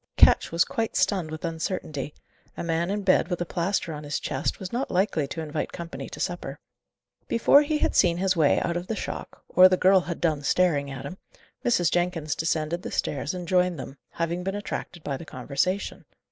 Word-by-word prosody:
Ketch - - +6
was 165 +1 +3
quite 225 -1 -2
stunned 185 -6 +1
with 155 +2 -5
uncertainty. 160 -3 -3 0.4
A - - -3
man 170 +1 0
in 205 +1 -1
bed, 185 -3 +4
with 180 -1 -2
a 175 - -1
plaster 175 0 -1
on 150 0 -7
his 145 0 -2
chest, 130 - -2
was 190 0 -6
not 255 +3 -1
likely 180 -6 +1
to 160 - -5
invite 155 -1 -3
company 170 0 -7
to - - -9
supper. - - -3 0.7
Before 235 +5 +5
he 300 +1 0
had - - 0
seen 170 -3 +4
his 190 +1 +1
way 155 -4 +4
out 170 - -1
of 175 +1 -3
the 225 - -2
shock, - - -6
or 185 +1 +7
the 185 - +2
girl 190 +1 +6
had 175 -1 -5
done 155 -4 +1
staring 145 -2 +2
at 135 -1 -7
him, 185 - -7 0.4
Mrs. 180 -9 +2
Jenkins 175 -4 0
descended 160 +1 -1
the - - -5
stairs 140 +4 -2
and 180 -1 -6
joined 180 -1 +2
them, 135 0 -7
having 170 +1 -2
been 195 +1 -2
attracted 180 -4 -5
by 140 -2 -2
the - - -9
conversation. 180 +8 -2
175 Hz, 205 wpm, -26 LUFS, 155-185 Hz, 0.7 s, or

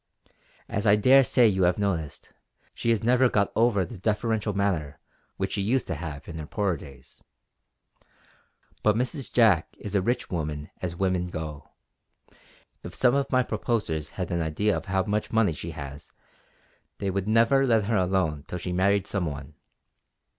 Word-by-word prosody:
As 100 +2 -2
I 100 - +7
dare 130 +6 +6
say 125 -1 +4
you 95 -3 +1
have 90 0 +2
noticed, 90 -8 -3 0.4
she 115 - -2
has 115 -1 +2
never 125 +2 +4
got 100 -3 +1
over 110 -5 +3
the 90 - -10
deferential 110 +1 0
manner 90 -8 -1 0.4
which - - -2
she - - -1
used 120 +6 +1
to - - -3
have 75 -3 -7
in 80 -1 -7
her 75 - -6
poorer 100 -2 0
days. 70 -5 -14 1.6
But 105 -1 +3
Mrs. 125 +3 -2
Jack 105 -9 +4
is 105 - -7
a 100 - +3
rich 120 +6 -1
woman 75 -3 -4
as 85 -2 -3
women 90 -1 0
go; 80 -4 -7 1.1
if - - -9
some 125 -1 +3
of 140 0 0
my 130 -1 +3
proposers 105 -10 -2
had 90 -2 -3
an 85 -1 0
idea 85 +7 0
of - - -4
how 95 0 +1
much 105 +2 -2
money 110 -6 +3
she 80 +2 -7
has 70 -3 -8 0.9
they 100 -1 -2
would 100 +1 -2
never 115 +5 +4
let 115 -3 +3
her 110 +2 0
alone 90 -6 0
till 90 - -4
she 90 0 -4
married 100 +2 +2
some 95 -4 -2
one. 70 0 -7
100 Hz, 175 wpm, -26 LUFS, 80-110 Hz, 1.6 s, I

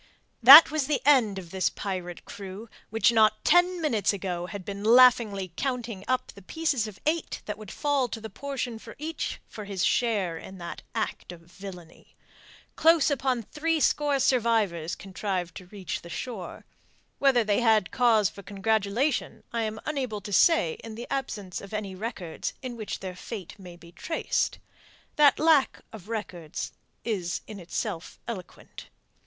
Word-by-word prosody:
That 280 +8 +11
was 305 -4 0
the 295 -2 +1
end 245 -9 +4
of 175 -3 -8
this 190 -1 +1
pirate 180 -3 -5
crew, 200 +2 -8 0.2
which 225 +1 +3
not 215 -2 +3
ten 355 +2 +4
minutes 230 - +1
ago 180 -3 -4
had 200 -1 -7
been 200 0 -6
laughingly 220 -6 +5
counting 240 -7 -3
up 255 0 -1
the 200 - -14
pieces 275 - -1
of 210 -2 -11
eight 315 +1 -1
that 210 - -4
would 215 -3 -10
fall 285 0 0
to 225 - -6
the 220 - -7
portion 265 +2 -4
of - - -11
each 315 +3 -4
for 210 - -9
his 195 -2 -1
share 200 -9 +1
in 190 - -10
that 170 -1 -7
act - - -3
of 175 -1 -11
villainy. 175 -1 -12 0.6
Close 325 -2 +4
upon 260 -3 0
threescore 300 0 +1
survivors 220 -10 +1
contrived 190 -2 -4
to 185 - -11
reach 190 -2 -5
the 170 - -11
shore. 205 +1 -6 0.5
Whether 265 -4 +4
they 210 0 +1
had 220 -5 +3
cause 230 -5 +4
for 200 - -10
congratulation, 215 +7 -1
I 230 - 0
am 220 0 -3
unable 255 -8 -3
to 205 +1 -7
say 195 - +4
in 225 -1 -8
the 235 +2 -6
absence 210 -9 -4
of 200 +2 -8
any 205 -2 -4
records 185 -4 -5
in 250 -2 -5
which 220 -3 -5
their 185 -1 -6
fate 190 -1 -7
may 180 -2 -11
be 170 -1 -15
traced. 325 - -2 0.6
That 290 -2 +6
lack 310 -3 +3
of 215 -1 -11
records 180 -8 -5 0.3
is 185 -7 -2
in 215 -2 -9
itself 180 0 -5
eloquent. 200 -7 -8
215 Hz, 160 wpm, -27 LUFS, 190-255 Hz, 0.6 s, That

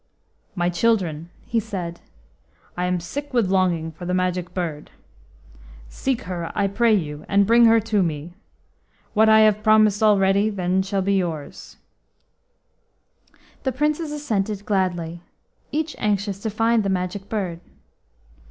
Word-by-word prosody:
"My 175 -1 0
children," 175 -5 0 0.2
he 230 - 0
said, 180 -6 -5 0.7
"I 180 - -1
am 180 0 0
sick 280 +11 -6
with 215 -6 +2
longing 175 -4 +1
for 170 +3 -10
the 180 - 0
Magic 180 -1 -1
Bird. 165 -5 -4 1.0
Seek 260 - -2
her, 175 -2 -5
I 205 - +1
pray 220 +3 +3
you, 150 -5 -3
and 200 0 +4
bring 235 +3 +5
her 225 0 +6
to 215 -2 0
me. 165 -1 -3 0.8
What 220 0 +4
I 220 0 +7
have 215 -1 +4
promised 215 -1 +4
already 200 -1 +4 0.3
shall 195 0 -1
then - - -4
be 200 - +2
yours." 165 -6 -5 1.8
The 265 - -1
Princes 300 +4 -1
assented 215 -9 -2
gladly, 175 -4 -1 0.5
each 310 +2 -2
anxious 200 -1 -1
to 220 - -3
find 225 +2 +2
the 200 - -1
Magic 190 +1 -3
Bird. 185 -6 -3
195 Hz, 140 wpm, -22 LUFS, 180-220 Hz, 1.8 s, I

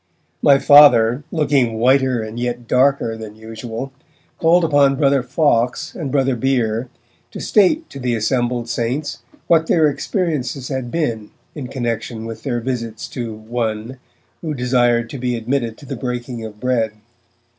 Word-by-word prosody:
My 140 -1 +6
Father, 135 -3 +6
looking 140 -7 +1
whiter 130 0 +2
and 110 +2 -7
yet 120 -1 -3
darker 130 -2 +2
than 110 -1 -9
usual, 115 +3 -7 0.5
called 170 +2 +4
upon 145 -3 +4
Brother 140 -1 +2
Fawkes 125 +2 0
and 150 -7 -5
Brother 135 -2 +1
Bere 120 -2 0 0.4
to - - -9
state 300 - +2
to - - -8
the 125 -2 -1
assembled 120 +1 -1
saints 120 +6 -2 0.3
what 160 -1 +3
their 160 -3 +4
experiences 145 - -2
had 130 -3 -3
been 120 -9 -2 0.2
in 140 -5 -6
connexion 120 -2 -4
with 115 0 -7
their 125 -4 -2
visits 115 -3 -4
to 120 -3 -5
'one' 110 +2 -4 0.4
who 155 -3 -3
desired 120 -2 +2
to 140 - -6
be 125 0 -1
admitted 115 0 -2
to 145 - -14
the - - -5
breaking 125 -2 -5
of 105 -1 -9
bread. 120 -3 0
125 Hz, 150 wpm, -19 LUFS, 115-140 Hz, 0.5 s, My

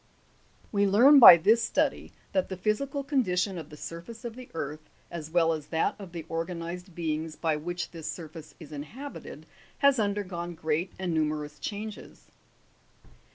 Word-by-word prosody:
5. - - -27
We 205 -1 +2
learn 255 +9 +7
by 200 -8 +12
this 215 +8 +4
study 235 - 0 0.2
that 280 - 0
the 190 - -5
physical 270 +9 -1
condition 195 - 0
of 155 -2 -9
the 150 - -11
surface 170 +10 -8
of 230 -1 -5
the 255 -1 -11
earth, 155 0 -5 0.2
as 160 -3 -6
well 165 -1 +3
as 150 -2 -6
that 160 0 0
of 195 -4 -9
the 165 -2 -7
organized 170 +2 -5
beings 160 -1 -3
by 160 -2 0
which 175 +4 -4
this 165 -3 -7
surface 155 -2 -10
is 155 -3 -12
inhabited, 220 - -8 0.3
has 280 -3 +4
undergone 190 -5 -2
great 160 +3 -1
and 180 -3 -2
nume 155 -1 +2
rous 150 -1 -9
changes. 210 +5 -7
175 Hz, 165 wpm, -28 LUFS, 160-215 Hz, 0.3 s, by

